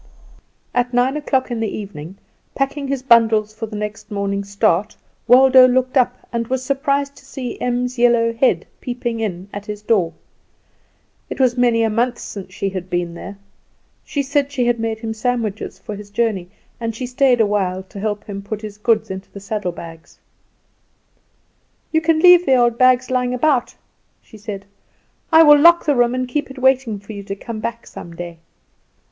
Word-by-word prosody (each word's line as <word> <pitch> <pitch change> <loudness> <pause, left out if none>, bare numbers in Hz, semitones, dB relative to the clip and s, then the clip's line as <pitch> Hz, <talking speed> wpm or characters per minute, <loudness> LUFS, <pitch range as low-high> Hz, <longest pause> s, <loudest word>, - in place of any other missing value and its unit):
At 245 0 0
nine 250 +3 +2
o'clock 265 -4 -1
in 235 - -2
the 225 - -1
evening, 195 -3 -8 0.4
packing 275 +1 -2
his 270 -1 -3
bundles 225 -4 +4
for 220 +1 -6
the 215 - -8
next 210 +2 -6
morning's 200 -1 -3
start, 200 +1 +1 0.3
Waldo 260 +1 +7
looked 255 +1 0
up, 250 -1 +1
and 230 -1 -2
was 260 +1 -2
surprised 280 +1 -1
to - - -16
see 265 -2 -7
Em's 250 0 -1
yellow 235 -1 +3
head 250 +3 +1
peeping 240 -2 -4
in 190 -4 -4
at 205 0 -7
his 210 0 -6
door. 190 -7 +1 1.2
It - - -6
was 255 -2 +3
many 240 -2 +3
a 225 - +2
month 240 +2 0
since 195 -2 -8
she 195 +1 -3
had 185 -1 -6
been 175 -1 -2
there. 195 +4 -9 0.7
She 285 - -2
said 280 +1 0
she 255 -3 0
had 240 -1 +1
made 225 -1 -2
him 220 0 -5
sandwiches 220 -2 -3
for 210 - -7
his 205 0 -10
journey, 205 -4 -1 0.3
and 230 -2 -3
she 255 - -4
stayed 250 0 +2
a 220 - +5
while 190 -2 -1
to 195 +1 -11
help 210 0 -3
him 200 -1 -7
put 210 +2 -6
his 210 -1 -8
goods 220 -2 +1
into 190 0 -7
the 200 - -10
saddlebags. 180 -6 -6 1.7
"You 320 - +2
can 325 0 +2
leave 355 0 +7
the 265 - +5
old 240 -1 +2
things 255 0 +4
lying 250 0 0
about," 260 -1 +1 0.4
she 220 - -16
said; 200 -2 -7 0.7
"I 320 0 +8
will 295 -1 +7
lock 340 +3 +6
the 295 - +3
room, 245 0 +2
and 255 0 -2
keep 290 +2 -2
it 265 - -11
waiting 260 -4 +2
for 200 +2 -10
you 200 - -7
to 195 0 -6
come 220 +2 -7
back 230 +2 -5
some 170 -1 -10
day." 170 -1 -8
230 Hz, 185 wpm, -19 LUFS, 205-255 Hz, 1.7 s, I